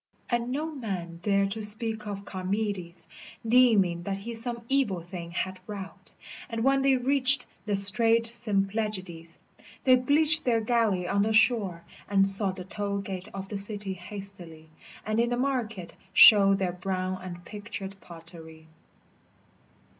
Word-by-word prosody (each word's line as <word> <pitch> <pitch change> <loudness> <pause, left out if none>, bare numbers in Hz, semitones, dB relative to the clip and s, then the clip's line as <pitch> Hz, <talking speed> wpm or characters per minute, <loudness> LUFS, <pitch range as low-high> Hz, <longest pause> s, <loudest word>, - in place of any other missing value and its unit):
And 240 0 0
no 295 +4 -1
man 185 - -5
dared 200 0 +1
to 220 +2 -4
speak 215 0 -3
of 200 -1 -6
Charmides 185 -2 -3 0.4
Deeming 220 -8 +4
that 195 +2 -3
he 225 +4 -6
some 235 +1 -5
evil 245 -11 +1
thing 175 -1 -7
had 185 +2 -3
wrought, 200 -2 -8 0.4
And 230 -1 -2
when 270 +1 +3
they 270 0 +4
reached 265 0 +2 0.2
the 205 - +1
strait 225 +4 +3
Symplegades 195 -6 -2 0.5
They 255 -1 +6
beached 305 +4 +2
their 235 -2 +2
galley 220 -6 +1
on 200 +2 +1
the 220 +2 +1
shore, 205 -7 +2 0.3
and 195 -1 +4
sought 195 -1 +1
The 185 - -7
toil 200 +1 -3
gate 195 0 -6
of 195 0 -6
the 205 - -3
city 200 -1 -4
hastily, 175 -4 -10 0.3
And 215 +1 0
in 235 0 +2
the 245 - -1
market 240 -8 -2 0.2
showed 195 -1 +8
their 185 -2 -1
brown 185 0 -3
and 175 -1 -8
pictured 205 -1 -7
pottery. 165 -1 -12
200 Hz, 145 wpm, -28 LUFS, 185-230 Hz, 0.5 s, showed